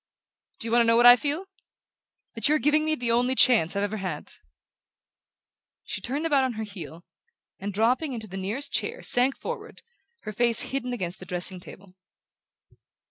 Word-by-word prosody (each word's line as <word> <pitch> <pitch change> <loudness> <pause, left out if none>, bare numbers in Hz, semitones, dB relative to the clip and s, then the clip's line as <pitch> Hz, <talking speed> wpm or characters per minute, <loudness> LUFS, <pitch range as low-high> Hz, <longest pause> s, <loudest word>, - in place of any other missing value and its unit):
Do 230 - -4
you - - -4
want 240 +1 +4
to 230 - +2
know 230 0 +4
what 240 - +5
I 245 0 +11
feel? 295 +8 -3 0.9
That 225 +4 +1
you're 305 - +4
giving 300 +1 +2
me 310 0 0
the 245 -5 -1
only 245 +2 +2
chance 215 -10 +4
I've 200 - 0
ever 205 +1 -2
had!" 185 -7 -5 1.5
She - - -5
turned 280 +9 -3
about 285 -4 +3
on 260 -2 -1
her 220 0 -5
heel 175 -5 -10 0.5
and, 200 +1 -4
dropping 245 - +1
into 225 -3 -5
the 190 -2 -10
nearest 205 +9 -4
chair, 475 +2 -2
sank 255 +2 +3
forward, - - -7 0.4
her 215 - -6
face 235 +2 +2
hidden 250 -2 -2
against 185 -7 -4
the 185 - -11
dressing 180 0 -4
table. 185 +1 -12
235 Hz, 180 wpm, -26 LUFS, 195-260 Hz, 1.5 s, I